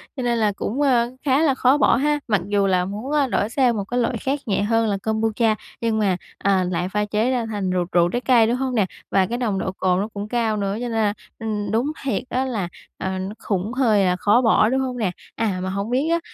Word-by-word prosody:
cho 260 - -4
nên 240 -1 +1
là 215 -2 +2
cũng, 250 +8 -3
ờ, 245 -4 +3
khá 275 +1 +3
là 290 -5 +3
khó 260 +2 +4
bỏ 285 - +4
ha, 295 +4 +1
mặc 210 -5 +2
dù 200 -1 +2
là 180 -1 +2
muốn, 210 +8 -5
a, 295 -2 +2
đổi 220 -3 0
sang 245 -3 +2
một 200 - -1
cái 245 +5 -2
loại 235 0 0
khác 270 +6 -2
nhẹ 200 -3 0
hơn 225 +1 +2
là 200 - 0
Kombucha 220 0 +1 0.3
nhưng 225 -1 0
mà, 195 -4 +1 0.2
à, 195 -2 +2
lại 180 0 -2
pha 210 +1 0
chế 215 +4 0
ra 245 -3 0
thành 205 -4 -3
rượu 180 -1 0
rượu 175 0 +3
trái 245 +7 -2
cây, 240 -4 +4
đúng 235 - +1
hông 260 0 -2
nè? 210 -4 +3 0.3
Và 190 -1 +3
cái 235 +5 -3
nồng 215 -6 -1
độ 190 - -2
cồn 185 -1 0
nó 205 - -1
cũng 205 0 -5
cao 225 -2 0
nữa 200 -1 -1
cho 215 - -4
nên 245 -1 -3
là, 220 -2 +1 0.3
ừm, 210 -3 -3
đúng 240 +7 +1
thiệt 255 -4 -1
á 260 +1 0
là, 220 -9 -2 0.3
ờ, 190 0 -3
nó 190 +2 -4
khủng 200 +3 -2
hơi 220 -7 +3
là 180 0 +2
khó 210 +6 +3
bỏ, 220 -2 +4
đúng 265 +2 +1
hông 255 -1 -3
nè? 210 -6 0 0.2
À, 205 -5 -1
mà 185 - -2
hổng 200 +3 -3
biết 265 +6 +1
á 335 0 +2
220 Hz, 265 wpm, -22 LUFS, 200-250 Hz, 0.3 s, khó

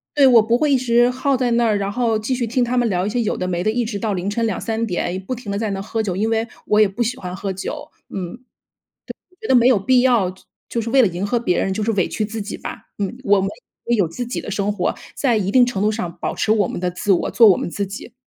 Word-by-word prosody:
对， 285 -2 +6
我 245 -4 +7
不 230 +2 +2
会 295 +1 +1
一 270 - +5
直 240 0 +3
耗 270 +1 0
在 245 -1 0
那 235 0 +3
儿， 210 -2 +2
然 200 0 -2
后 230 0 +1
继 220 +5 -2
续 245 -2 -1
听 250 +2 +1
他 240 +1 -1
们 240 -2 +2
聊 185 -1 0
一 - - -1
些 245 +2 0
有 215 - -1
的 185 - -2
没 175 -1 -1
的， 215 - +1
一 235 +1 0
直 205 -3 -4
到 220 -3 -1
凌 180 0 -3
晨 225 +3 0
2-3 225 +2 -2
点， 180 0 -2
不 255 +7 -4
停 225 -4 -7
地 200 - -2
在 220 -2 -1
那 195 - -3
喝 220 +3 -2
酒， 195 -5 -2
因 210 +4 0
为 225 +1 0 0.2
我 210 0 +3
也 210 - +6
不 200 +5 -2
喜 245 +3 -2
欢 180 -5 -6
喝 195 0 -4
酒。 290 +11 -6 0.2
嗯， 185 0 -5 0.7
对， - - -7 0.2
我 365 - -28
觉 440 - -7
得 - - +3
没 245 -1 +6
有 255 -4 +5
必 250 +6 +3
要 235 -8 +3
就 185 - -18 0.3
就 235 - -1
是 230 - -4
为 265 +1 +5
了 220 - +5
迎 180 +2 -4
合 240 +3 +1
别 205 -6 0
人， 195 - 0
就 210 +2 -2
是 225 - +1
委 195 -5 +1
屈 215 - -2
自 220 +1 -5
己 205 - -6
吧。 - - -8
嗯， 205 +3 -3
我 205 0 +4
们 195 - -1 0.4
也 240 - +2
有 195 -6 +2
自 245 +10 -5
己 245 - -4
的 - - -7
生 205 0 -1
活。 - - -1 0.2
在 245 -6 +2
一 195 -1 -1
定 250 +2 +6
程 225 -5 0
度 215 - +3
上 180 -6 -4
保 - - -2
持 215 - 0
我 210 -4 +3
们 - - -5
的 180 0 -1
自 180 +3 -1
我， 180 - +2
做 225 -3 +6
我 185 - +6
们 - - -3
自 200 +3 -3
己。 215 +4 -9
220 Hz, 325 characters per minute, -20 LUFS, 195-240 Hz, 0.7 s, 我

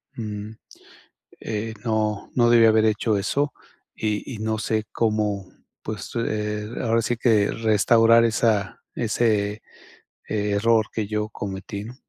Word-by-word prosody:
mm, 105 -1 -5 0.9
eh, 110 +1 -4
no 110 -2 -1
no 120 -1 +4
debí 115 -1 +6
haber 110 0 +4
hecho 110 0 +1
eso 140 +9 -1 0.4
y 105 -1 -2
y - - -9
no 110 0 -1
sé 110 -1 -1
cómo, 105 -4 -1 0.3
pues, 110 -1 -6
eh, 105 -2 -2
ahora 115 -1 +2
sí 120 +2 -1
que 110 -4 +3
restaurar 115 +1 +4
esa 110 -3 0
ese, 105 -2 0 0.7
eh, 105 -1 -1
error 110 0 +3
que 110 -3 -2
yo 105 0 -2
cometí, 100 0 -6
¿no? 125 +2 -9
110 Hz, 135 wpm, -23 LUFS, 105-115 Hz, 0.9 s, debí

